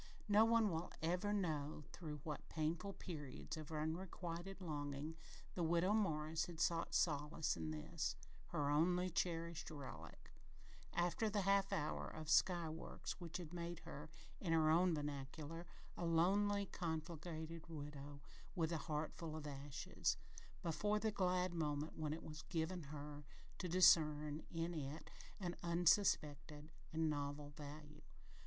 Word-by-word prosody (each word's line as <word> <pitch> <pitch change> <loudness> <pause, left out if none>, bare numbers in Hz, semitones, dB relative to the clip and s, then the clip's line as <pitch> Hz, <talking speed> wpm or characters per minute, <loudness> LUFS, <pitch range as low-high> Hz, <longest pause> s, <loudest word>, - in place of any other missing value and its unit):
No 210 +1 +7
one 225 -3 +5
will 165 +2 -2
ever 180 +5 +1
know 155 -7 0
through 150 -4 -5
what 150 -3 -5
painful 165 +5 -1
periods 150 -9 -6
of 155 0 -7
unrequited 170 +3 -3
longing 150 -2 -3 0.4
the 180 - -2
Widow 170 +4 +4
Morris 160 -6 +1
had 170 -2 -8
sought 170 -1 +2
solace 150 0 +2
in 80 -2 -3
this, 75 -1 -2 0.3
her 145 -1 +1
only 180 +4 +3
cherished 170 -1 -1
"relic," 145 -4 -8 0.6
after 175 +5 +2
the 205 0 +1
"half 195 +1 +4
hour 155 -6 0
of 155 -1 -4
sky 175 0 +5
works" 160 +3 -5
which 170 -1 -4
had 175 -2 -7
made 170 -1 -4
her, 150 +2 -7 0.3
in 170 -4 +1
her 155 -1 +5
own 175 +1 +5
vernacular, 150 +3 -4 0.3
"a - - -4
lonely, 200 +5 +4
conflagrated 165 -1 -4
widow, 145 -2 -7 0.3
with 165 -2 +1
a 165 - 0
heart 155 +1 0
full 160 -3 -5
of 155 -1 -5
ashes," 140 -1 -1 0.5
before 205 +6 +2
the 220 +1 +1
glad 185 -2 +2
moment 150 -2 -1
when 155 -1 -1
it 160 - -3
was 155 0 -6
given 165 0 -1
her 145 0 -6 0.4
to 180 - -2
discern 150 -4 +6
in 165 +1 -1
it 150 0 -5 0.3
an 175 -3 -2
unsuspected 155 -4 +3 0.2
and 160 0 +2
novel 145 -1 -2
value. 150 +1 -9
160 Hz, 140 wpm, -42 LUFS, 150-175 Hz, 0.6 s, No